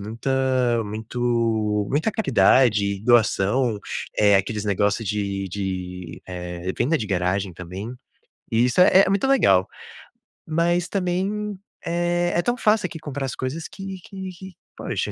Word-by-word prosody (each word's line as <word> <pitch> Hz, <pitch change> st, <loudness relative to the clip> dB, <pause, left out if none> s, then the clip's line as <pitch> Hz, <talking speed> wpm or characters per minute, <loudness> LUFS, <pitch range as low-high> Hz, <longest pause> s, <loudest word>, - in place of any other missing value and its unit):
muita 125 Hz, +2 st, 0 dB
muito 110 Hz, -1 st, -1 dB
muita 155 Hz, +11 st, +1 dB
caridade, 105 Hz, -, +3 dB
doação, 115 Hz, 0 st, +3 dB, 0.4 s
eh, 105 Hz, -1 st, +5 dB
aqueles 105 Hz, +2 st, 0 dB
negócio 105 Hz, +2 st, +1 dB
de 100 Hz, -1 st, -2 dB
de, 90 Hz, -3 st, -5 dB
eh, 90 Hz, 0 st, -5 dB
venda 150 Hz, +7 st, +1 dB
de 110 Hz, -, -3 dB
garagem 95 Hz, 0 st, -1 dB
também, 95 Hz, +7 st, -7 dB, 0.6 s
e 115 Hz, +1 st, +3 dB
isso 125 Hz, +8 st, +2 dB
é 185 Hz, +1 st, +7 dB
é 190 Hz, -, -1 dB
muito 200 Hz, +5 st, +1 dB
legal. 95 Hz, -, +4 dB, 0.8 s
Mas 175 Hz, +2 st, +1 dB
também, 195 Hz, +3 st, -2 dB, 0.3 s
eh, 175 Hz, +1 st, 0 dB
é 175 Hz, -, +3 dB
tão 240 Hz, +6 st, -1 dB
fácil 210 Hz, -4 st, +2 dB
aqui 170 Hz, -, -8 dB
comprar 145 Hz, -2 st, -4 dB
as -, -, -5 dB
coisas 140 Hz, +6 st, -4 dB
que 195 Hz, -1 st, -8 dB
que 190 Hz, +1 st, -8 dB
que, 190 Hz, +1 st, -11 dB, 0.2 s
poxa -, -, -3 dB
120 Hz, 140 wpm, -23 LUFS, -, 0.8 s, é